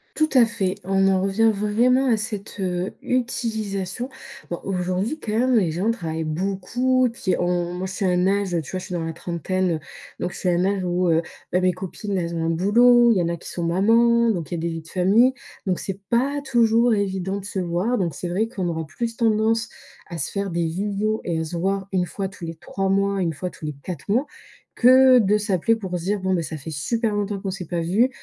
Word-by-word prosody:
Tout 310 0 +2
à 250 -2 +7
fait, 195 -5 -1
on 195 0 +2
en 190 -1 +2
revient 220 +3 +3
vraiment 235 +6 +2
à 225 -3 +3
cette, 210 -2 -5
heu, 180 0 -2
utilisation. 230 -4 -2 0.4
Bon, 175 - -3
aujourd'hui, 185 - -2
quand 210 - -5
même, 250 +2 +3
les 175 -6 +1
gens 185 +8 0
travaillent 160 -7 -3
beaucoup. 200 +10 0
Puis 210 -5 -1
on 175 0 0
moi, 180 +1 -4
je 190 - -6
suis 200 - -2
à 185 - +3
un 180 +1 +2
âge 200 0 +1
tu 140 - -10
vois, 185 - -2
je - - -7
suis - - -9
dans 170 -2 -2
la 165 - -4
trentaine, 180 +2 -2
heu, - - -7 0.4
donc 175 - -2
je - - -8
suis 185 - -1
à - - +2
un 175 +2 +2
âge 195 -2 0
où, 180 0 +1
heu, 165 0 +3 0.3
bah, 180 - +2
mes 185 0 +3
copines, 190 +2 -4
elles 170 -1 -2
ont 165 -1 -1
un 165 - +1
boulot. 235 +7 +5
Il - - +1
y - - +2
en 170 - 0
a 170 - -3
qui - - -10
sont 175 - -4
mamans, 230 +6 +4
donc 170 -8 -3
il - - 0
y - - -5
a - - -3
des 170 - -1
vies 165 -1 -5
de 160 - -16
famille, 205 +8 +4 0.3
donc 185 -2 0
c'est 195 0 -5
pas 280 +4 +1
toujours 235 -2 +3
évident 195 -1 -1
de 195 - -8
se 200 - -4
voir. 180 +8 0
Donc 170 -7 -1
c'est 175 - -5
vrai 210 +6 0
qu'on 185 -7 -3
aura 160 -2 -3
plus 230 +8 -4
tendance 225 0 +1 0.4
à 170 -2 -6
se 145 - -2
faire 200 -1 -2
des 170 0 0
visios 205 +5 -1
et 165 -2 -1
à - - -1
se 170 +2 -5
voir 195 +2 -1
une 185 -2 +1
fois 195 +3 -4
tous 185 -2 -10
les 165 0 -6
3 195 +3 -3
mois, 195 0 +1
une 165 -2 0
fois 170 +5 -4
tous 160 - -12
les 150 -1 -3
4 180 0 -6
mois, 255 +7 +2 0.5
que 255 +1 +7
de 210 -1 +3
s'appeler 210 +1 +1
pour 185 -4 -4
se 170 - -8
dire: 205 +1 0
«Bon 190 0 0
ben, 170 -2 +1
ça 160 0 -5
fait 155 +3 -8
super 215 - -1
longtemps 205 -1 -1
qu'on 195 - -3
s'est 185 -3 -6
pas 170 -1 -2
vues, 205 +10 +3
195 Hz, 250 wpm, -23 LUFS, 175-225 Hz, 0.5 s, à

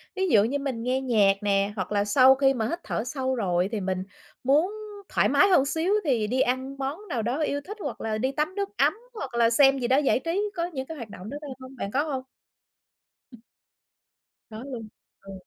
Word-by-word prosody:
Ví 380 0 0
dụ 210 -5 +5
như 280 +6 -1
mình 260 -5 -3
nghe 255 +2 0
nhạc 215 -6 +4
nè, 200 0 +1
hoặc 190 -1 -4
là 205 0 +1
sau 260 +5 +6
khi 270 0 +3
mà 225 -4 -1
hít 345 - -3
thở 220 - -2
sâu 260 0 -2
rồi 180 -4 0
thì 215 -3 -2
mình 185 0 -2 0.4
muốn 300 +9 +3 0.4
thoải - - +2
mái - - +5
hơn 280 -7 +5
xíu 325 +7 0
thì 235 -8 +1
đi 255 +3 +1
ăn 260 +2 -1
món 290 +10 -4
nào 235 -4 -1
đó 245 +6 -2
yêu 285 -1 -1
thích, 415 +8 -9
hoặc 285 -9 -5
là 215 -1 -2
đi 260 +4 0
tắm 305 +7 -2
nước 400 -1 -2
ấm - - +4 0.2
hoặc 275 - -6
là 230 -1 +4
xem 270 +2 +5
gì 240 - -1
đó 260 - +4
giải 285 -3 +2
trí, 395 +7 -2
có 340 0 -1
những 270 -7 -5
cái 320 +1 -8
hoạt 235 -5 -8
động 195 +1 -9
đó 285 - -5
đó 295 - -8
không 260 +1 -11
bạn 200 -5 -5
có 280 +3 +1
hông? 270 -4 -3 2.3
Có 220 +3 -8
luôn? 245 -5 -7 0.3
Ừ. 195 0 -11
260 Hz, 225 wpm, -26 LUFS, 225-285 Hz, 2.3 s, sau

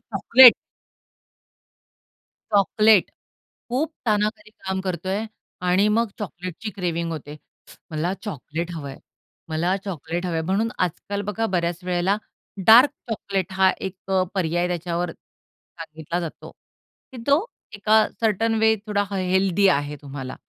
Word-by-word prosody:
Chocolate. 250 0 +8 2.0
Chocolate. 210 0 +4 0.6
खूप 300 +6 -1
ताणाखाली 210 0 0
काम 190 -3 -4
करतोय 190 +3 -3 0.4
आणि 185 +3 +4
मग 230 +2 +2
चॉकलेटची 185 +2 -6
क्रेव्हिंग 170 -3 -2
होते. 150 -1 -7 0.5
मला 160 +3 -1
चॉकलेट 170 - -5
हवंय. 140 -4 -7 0.5
मला 170 +4 0
चॉकलेट 175 -1 -4
हवंय. 165 -2 -1
म्हणून 195 +6 0
आजकाल 200 +3 -2
बघा 225 +2 -1
बऱ्याच 170 -1 0
वेळेला 180 +2 +1 0.5
डार्क 245 +6 +8 0.2
चॉकलेट 195 -4 -3
हा 190 0 +4 0.2
एक 190 0 -15
अ, 190 -1 +3
पर्याय 175 -1 0
त्याच्यावर 175 0 -2
सांगितला 160 +1 -9
जातो. 165 -3 -7 0.6
की - - -9
तो 285 +7 +3 0.3
एका 215 +1 +4
सर्टन 225 +1 +1
वे 220 0 +4
अ, - - -8
थोडा 205 -1 0
हेल्दी 190 0 +2
आहे 145 +1 -5
तुम्हाला. 135 -2 -7
185 Hz, 120 wpm, -23 LUFS, 170-210 Hz, 2.0 s, चॉकलेट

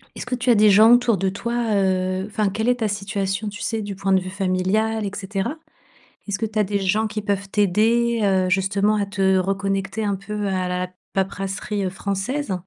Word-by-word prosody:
est-ce - - -6
que 250 0 -2
tu 250 +1 -2
as 235 - +6
des 210 0 +6
gens 215 +3 +7
autour 245 -3 +3
de 190 +1 0
toi, 235 +5 -4 0.2
heu 185 -1 0
enfin, 210 -1 0
quelle 220 +4 -2
est 250 - +4
ta 220 - +1
situation, 200 0 -2
tu 205 +2 -9
sais? 225 -1 -2
Du 205 -1 -5
point 195 0 -2
de 190 - +5
vue 185 - -6
familial, 195 +3 0
et 195 - -3
cetera? 195 +8 -3 0.7
Est-ce 200 - -1
que 225 - -1
tu 215 0 -4
as 210 - +4
des 200 +1 -1
gens 210 +4 +1
qui 215 0 -4
peuvent 200 -1 -2
t'aider, 225 +4 +2
heu, 190 -2 +2
justement 195 +3 +2
à 205 - +1
te 195 -1 +1
reconnecter 195 +2 -1
un 200 -1 0
peu 205 +1 -4
à 185 -1 -1
la 180 0 -2 0.3
paperasserie, 195 +1 -2
heu, - - 0
française? 200 +6 -3
200 Hz, 215 wpm, -22 LUFS, 190-215 Hz, 0.7 s, gens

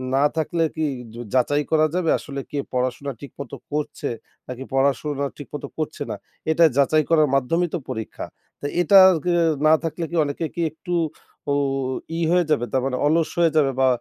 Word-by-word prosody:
না 140 - +3
থাকলে 165 +1 0
কি 160 - 0 0.3
য - - -9 0.2
যাচাই 145 +3 +2
করা 155 -1 +4
যাবে, 180 -3 +1
আসলে 140 -1 -6
কে 145 - -2
পড়াশোনা 130 +3 -1
ঠিকমতো 140 -2 -8 0.2
করছে, 150 -1 -3 0.4
নাকি 125 +1 -6
পড়াশোনা 140 +1 +1
ঠিকমতো 145 0 -7
করছে 155 -1 -4
না? - - -2 0.4
এটা 165 +2 +4
যাচাই 155 +3 +4
করার 155 -2 +5
মাধ্যমেই 165 +6 +1
তো 175 - -2
পরীক্ষা। 110 -4 -5 0.3
তা - - -8 0.2
এটা 195 +3 +6
আর 180 - +3
কি 180 - +1
এ - - +4 0.2
না 155 - +7
থাকলে 165 +1 -3
কি 170 - -4
অনেকে 145 +3 -3
কি 170 - -2
একটু, 175 +3 -6 0.6
উ - - +3 0.6
ই - - -2
হয়ে 180 0 +3
যাবে? 130 -5 +2
তার 130 - +1
মানে 130 -1 -1
অলস 160 +1 +2
হয়ে 165 -2 +4
যাবে 140 -3 +4
বা 130 - +4
150 Hz, 190 wpm, -23 LUFS, 135-165 Hz, 0.6 s, না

